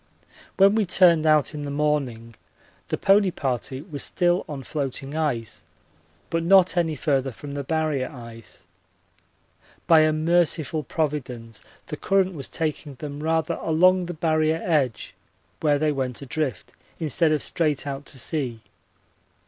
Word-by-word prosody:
When 195 Hz, +1 st, +6 dB
we 215 Hz, -3 st, +1 dB
turned 170 Hz, -4 st, +4 dB
out 155 Hz, 0 st, +3 dB
in 150 Hz, -, -5 dB
the 145 Hz, -, -4 dB
morning 140 Hz, -6 st, -1 dB, 0.5 s
the -, -, -2 dB
pony 195 Hz, 0 st, +4 dB
party 130 Hz, -3 st, -3 dB
was 150 Hz, -5 st, -6 dB
still 175 Hz, 0 st, +1 dB
on 140 Hz, -3 st, -6 dB
floating 135 Hz, 0 st, -4 dB
ice 135 Hz, -8 st, -2 dB, 0.7 s
but 165 Hz, -, +1 dB
not 185 Hz, +1 st, +5 dB
any 165 Hz, -3 st, +1 dB
further 135 Hz, -2 st, 0 dB
from 145 Hz, +4 st, -9 dB
the 140 Hz, 0 st, -4 dB
Barrier 155 Hz, -3 st, -1 dB
ice. 115 Hz, -4 st, -12 dB, 1.2 s
By 165 Hz, -2 st, +6 dB
a 155 Hz, 0 st, +4 dB
merciful 160 Hz, -1 st, +1 dB
providence 130 Hz, -9 st, -4 dB, 0.2 s
the 150 Hz, -, -6 dB
current 190 Hz, +1 st, +1 dB
was 140 Hz, -5 st, -7 dB
taking 155 Hz, -3 st, -3 dB
them 145 Hz, +1 st, -7 dB
rather 160 Hz, 0 st, 0 dB
along 180 Hz, +3 st, +3 dB
the 175 Hz, -, -5 dB
Barrier 155 Hz, 0 st, +1 dB
edge, 140 Hz, -9 st, 0 dB, 0.5 s
where 150 Hz, -2 st, +2 dB
they 155 Hz, +1 st, +1 dB
went 130 Hz, -2 st, -3 dB
adrift, 135 Hz, -5 st, -3 dB, 0.3 s
instead 160 Hz, +1 st, +1 dB
of 155 Hz, -, 0 dB
straight 150 Hz, -5 st, -1 dB
out 140 Hz, 0 st, -5 dB
to -, -, -8 dB
sea. 130 Hz, -5 st, -3 dB
150 Hz, 145 wpm, -24 LUFS, 135-165 Hz, 1.2 s, When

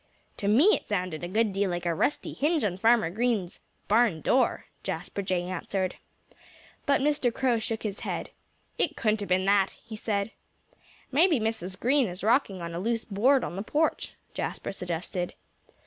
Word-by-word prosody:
"To 200 Hz, -, -2 dB
me 285 Hz, -, +6 dB
it -, -, -7 dB
sounded 180 Hz, -5 st, -2 dB
a -, -, -2 dB
good 215 Hz, +2 st, +1 dB
deal 195 Hz, 0 st, +1 dB
like 175 Hz, 0 st, -3 dB
a 170 Hz, -, +2 dB
rusty 225 Hz, -, 0 dB
hinge 310 Hz, +2 st, +1 dB
on 190 Hz, -3 st, -1 dB
Farmer 225 Hz, -6 st, +4 dB
Green's 215 Hz, -4 st, -1 dB, 0.3 s
barn 210 Hz, -7 st, +3 dB
door," 255 Hz, -2 st, +2 dB, 0.2 s
Jasper 180 Hz, +2 st, -4 dB
Jay 185 Hz, -2 st, 0 dB
answered. 185 Hz, +1 st, -2 dB, 0.9 s
But 280 Hz, -1 st, +3 dB
Mr. 285 Hz, -4 st, +2 dB
Crow 245 Hz, -1 st, +1 dB
shook 220 Hz, 0 st, -3 dB
his 205 Hz, -2 st, -3 dB
head. -, -, -4 dB, 0.5 s
"It -, -, +1 dB
couldn't 215 Hz, -1 st, +1 dB
have 205 Hz, -, -5 dB
been 185 Hz, +1 st, +2 dB
that," 195 Hz, -1 st, +3 dB
he 225 Hz, -, -7 dB
said. 210 Hz, -1 st, -1 dB, 0.8 s
"Maybe 315 Hz, +1 st, +4 dB
Mrs. 215 Hz, -4 st, -3 dB
Green 265 Hz, 0 st, +3 dB
is 180 Hz, +1 st, -7 dB
rocking 215 Hz, -5 st, +2 dB
on 170 Hz, 0 st, -5 dB
a 170 Hz, -, -3 dB
loose 230 Hz, +3 st, -1 dB
board 245 Hz, +6 st, +3 dB
on -, -, -4 dB
the 195 Hz, -, -3 dB
porch," 300 Hz, +9 st, 0 dB, 0.2 s
Jasper -, -, -3 dB
suggested. 180 Hz, 0 st, -4 dB
205 Hz, 175 wpm, -28 LUFS, 185-240 Hz, 0.9 s, me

